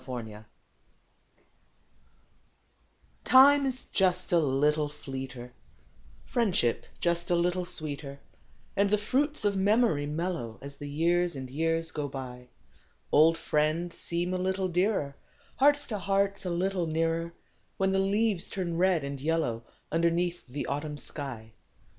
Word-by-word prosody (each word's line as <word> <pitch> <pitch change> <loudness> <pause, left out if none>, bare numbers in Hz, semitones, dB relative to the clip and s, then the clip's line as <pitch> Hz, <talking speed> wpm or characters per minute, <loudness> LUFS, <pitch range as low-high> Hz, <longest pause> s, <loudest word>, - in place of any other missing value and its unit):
A597234 115 -5 -7 2.9
IME 280 +2 +8
is 255 -1 -3
"just 185 -1 +1
a 170 - +6
little 150 +1 +1
fleeter; 130 -3 -7 0.8
priendship 190 - +1
just 170 0 0
a 175 - +3
little 175 +1 0
sweeter; 145 -4 -4 0.6
And 200 0 +2
the 210 - +3
jruits 265 +5 0
of 205 - +3
memoru 195 -6 +2
mellcrcO 155 -8 -3
' - - -31
I - - -7
As 140 0 -8
the 145 0 -7
Ljears 175 0 +2
and 130 -1 -6
Ejears 165 +3 +1
ao 145 -1 -2
btj. 125 -2 -7
d - - -30 0.6
Old 160 +2 +5
'friends 165 +2 0
seem 175 +2 -1
a - - 0
little 190 +1 -1
dearer; 180 -5 0 0.4
Hearts 290 +1 +4
to 210 -3 -4
Hearts 195 +1 0
a - - -1
little 180 0 -1
nearer, 165 +1 -1 0.2
( - - -41
ADhen 190 0 +2
the 195 - +2
leases 200 -1 +1
turn 175 -3 -3
red 180 -3 +2
and 140 0 -5
Ljello^ 150 -6 -1 0.3
Underneath 170 +1 0
the 135 +3 -4
Autumn 150 +1 -3
shij. 135 -6 -6
170 Hz, 140 wpm, -29 LUFS, 145-190 Hz, 2.9 s, IME